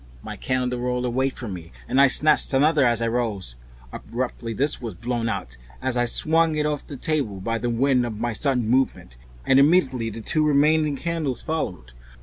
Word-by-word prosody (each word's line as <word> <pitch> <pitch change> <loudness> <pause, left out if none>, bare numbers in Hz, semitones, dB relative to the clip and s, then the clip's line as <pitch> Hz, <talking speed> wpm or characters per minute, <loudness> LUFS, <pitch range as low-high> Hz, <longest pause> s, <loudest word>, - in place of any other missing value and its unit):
My - - -7
candle 125 -1 -2
rolled 125 0 -1
away 130 +2 0
from 120 -6 -7
me 85 -2 -9 0.2
and 135 - +3
I 140 - +7
snatched 150 +2 +3
another 150 +2 +3
as 120 -2 +2
I - - +1
rose. 110 - -2 0.4
Abruptly 120 -1 -5
this 140 +6 -1
was 115 -6 -6
blown 120 +3 -2
out 65 - -5 0.2
as 130 -1 -2
I 120 0 +2
swung 160 +5 +2
it 150 0 0
off 150 -1 -3
the 140 - -8
table 130 -10 -2
by 115 +4 -2
the 120 - -2
wind 125 +2 +2
of 110 -2 -6
my 120 0 -1
sudden 125 -1 +1
movement, 130 - 0 0.3
and 135 - +5
immediately 135 -6 +3
the 110 +1 -8
two 155 +7 0
remaining 150 0 +3
candles 155 -4 -3
followed. 90 - -4
125 Hz, 190 wpm, -23 LUFS, 115-145 Hz, 0.4 s, I